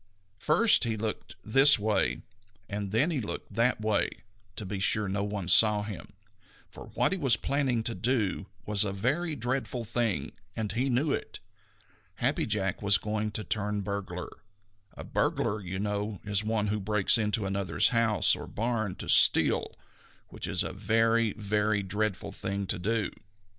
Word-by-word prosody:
First 205 - +4
he 115 -2 -1
looked 110 0 -5
this 135 +7 +6
way, 100 - 0 0.4
and 100 -1 -4
then 130 +11 +2
he 145 -6 -1
looked 105 - -6
that 115 +3 +2
way, 110 -1 +1 0.5
to 105 - -5
be 95 +1 -4
sure 105 +2 +1
that 95 - -3
no 100 0 -1
one 100 -3 -4
saw 105 +3 +6
him, 100 -6 -8 0.6
for - - -11
what - - +2
he 190 - -1
was 130 -7 +3
planning 135 -5 0
to 115 - -1
do 110 -5 -1 0.2
was 105 -1 +3
a 100 -2 -2
very 145 - -1
dreadful 125 -1 -3
thing, 110 - -1 0.2
and 110 -2 -2
he 125 +5 0
knew 135 +4 +1
it. - - -4 0.8
Happy - - 0
Jack 95 -3 -1
was 100 -2 +5
going 105 +3 -3
to 105 0 -4
turn 105 -1 -2
burglar. 95 -3 -5 0.6
A - - -8
burglar, 105 0 -1
you 95 0 -5
know, 105 0 -3
is 105 0 -1
one 105 -1 -1
who 105 +1 -1
breaks 105 +2 +3
into 105 0 0
another's 95 -3 +1
house 115 -3 +3
or - - -8
barn 110 -3 -2
to - - -8
steal, - - +4 0.5
which - - -5
is - - +1
a - - -5
very, 115 +2 +1
very 105 0 0
dreadful 100 0 -3
thing 100 0 -4
to 90 - -2
do. 105 +1 -1
105 Hz, 170 wpm, -28 LUFS, 100-115 Hz, 0.8 s, this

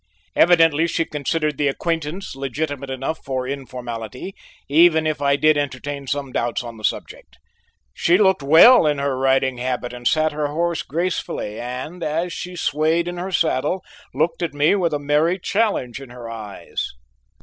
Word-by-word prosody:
Evidently 165 -2 +5
she 165 - 0
considered 150 0 -2
the 145 - +2
acquaintance 165 +4 -3
legitimate 140 +1 -4
enough 135 +4 -3
for 130 -2 -3
informality, 125 - -6 0.3
even 160 +2 +5
if 155 -2 -1
I 140 0 +3
did 155 +1 +3
entertain 140 0 -4
some 140 0 -3
doubts 120 0 -1
on 115 -1 -8
the 110 - -13
subject. - - -4 0.6
She 175 +2 +3
looked 190 -5 +3
well 160 - +7
in 150 -1 +1
her 140 -1 -1
riding 130 -1 +1
habit 125 -1 -3
and 120 -1 -3
sat 155 0 +2
her 150 0 -2
horse 170 +2 -1
gracefully, 165 - -3
and 130 +8 -6
as 165 +3 -1
she 180 0 -6
swayed 160 +1 +1
in 175 0 -4
her 185 +2 -4
saddle, 165 +1 0 0.3
looked 165 0 -1
at 170 -4 -2
me 145 +4 +3
with 175 -6 +1
a - - +1
merry 150 +5 +2
challenge 195 - -1
in 135 - -10
her 120 -1 -9
eyes. 110 -3 -6
145 Hz, 165 wpm, -21 LUFS, 130-165 Hz, 0.6 s, well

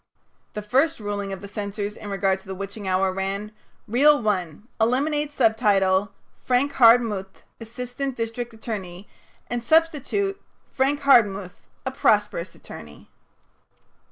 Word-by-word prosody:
The 210 - -5
first 270 +9 +1
ruling 205 -2 -4
of 195 - -6
the 200 - -8
censors 205 0 -5
in 205 - -9
regard 195 -1 0
to 190 - -20
"The 190 - -5
Witching 200 +1 -7
Hour" 185 0 +1
ran: 195 +2 -3 0.4
"Reel 285 +6 +5
One 195 -3 -2
Eliminate 290 +6 +1
subtitle 205 -6 +2 0.3
'Frank 260 +3 +1
Hardmuth, 230 -6 +3 0.2
assistant 245 +3 -5
district 230 +1 -4
attorney,' 205 -5 -7 0.4
and 240 0 -3
substitute 330 - +1 0.3
'Frank 280 +2 0
Hardmuth, 205 -9 +4 0.3
a 260 - -1
prosperous 210 -8 +1
attorney.'" 75 -2 -13
215 Hz, 125 wpm, -24 LUFS, 195-250 Hz, 0.4 s, Reel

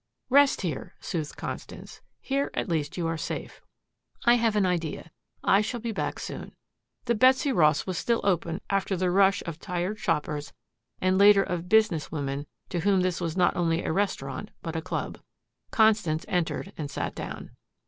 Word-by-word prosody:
"Rest 280 +1 +5
here," 165 -8 -4
soothed 160 -5 -4
Constance. - - -7 0.2
"Here 275 +1 -1
at - - -1
least 160 -3 -2
you 175 - -1
are 165 -1 -1
safe. - - -5 0.6
I 240 - +7
have 230 -3 +2
an 205 -2 +3
idea. 165 -2 -2 0.3
I 195 - +5
shall 235 +3 -3
be 230 0 -3
back 215 - -3
soon." - - -7 0.5
The 235 - +2
Betsy 260 +4 +4
Ross 155 - +3
was 185 -3 -2
still 235 -1 +1
open 170 -4 0
after 195 -1 0
the 180 0 +1
rush 195 +1 +4
of 165 -2 -6
tired 180 +5 -3
shoppers 150 -4 -2 0.5
and 185 +1 +2
later 200 -1 +7
of 180 -2 -4
business 210 -10 +3
women 140 -1 -3 0.2
to 175 - -2
whom 195 +2 +3
this 180 -1 -1
was 165 0 -2
not 180 -1 +3
only 165 -1 +1
a - - 0
restaurant 140 -9 -2
but 165 -1 -4
a 160 - -1
club. - - -4 0.5
Constance 210 -7 +3
entered 180 +2 -1
and 145 -2 -3
sat - - -3
down. - - -7
180 Hz, 175 wpm, -27 LUFS, 165-210 Hz, 0.6 s, I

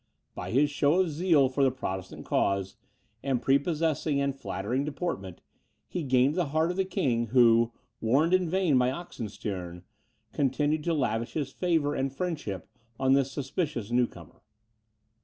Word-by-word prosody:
By - - -6
his 145 +5 +3
show 145 +4 +2
of 180 -4 0
zeal 155 -3 +3
for 135 +2 0
the 135 - +5
Protestant 95 -8 -5
cause, 100 -1 0 0.5
and 135 -3 0
prepossessing 150 +2 +1
and 140 -1 0
flattering 125 +1 -2
deportment, 145 - -4 0.5
he 180 - -3
gained 130 0 +3
the 175 -2 0
heart 160 +4 +1
of 180 - -6
the 190 - +1
king, 120 -10 0
who, 115 -1 +5 0.3
warned 140 +10 +3
in 185 -2 +3
vain 185 -4 +2
by 125 0 +3
Oxenstiern, 100 - -6 0.5
continued 145 +2 +1
to 170 -1 +1
lavish 115 -4 -1
his 140 -3 -2
favour 160 -4 +1
and 135 -1 -1
friendship 145 - -4 0.3
on 130 0 +3
this 135 -1 +2
suspicious 135 - -3
new 120 0 +3
comer. - - -15
135 Hz, 155 wpm, -28 LUFS, 120-160 Hz, 0.5 s, the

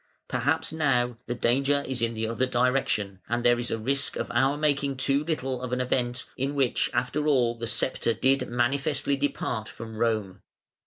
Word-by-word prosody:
Perhaps - - 0
now 125 -6 +1
the 120 - -2
danger 140 +4 +2
is 130 -2 -2
in 115 0 0
the 110 0 -1
other 115 +3 0
direction, 120 -6 0
and 120 +1 0
there 120 0 +4
is 120 - -1
a 115 - -1
risk 135 +5 0
of - - -3
our 135 +4 +3
making 145 -2 0
too 140 +2 +1
little 135 -5 -2
of 125 -1 -5
an 125 - 0
event 125 0 -1
in 140 +2 -2
which 135 -3 +2
after 150 +4 -1
all 125 -5 +3
the 115 0 -5
sceptre 115 +1 +1
did 130 +3 +2
manifestly 135 +4 +1
depart 135 -5 -2
from 110 -1 -9
Rome. 110 -4 -1
125 Hz, 180 wpm, -27 LUFS, 115-140 Hz, -, there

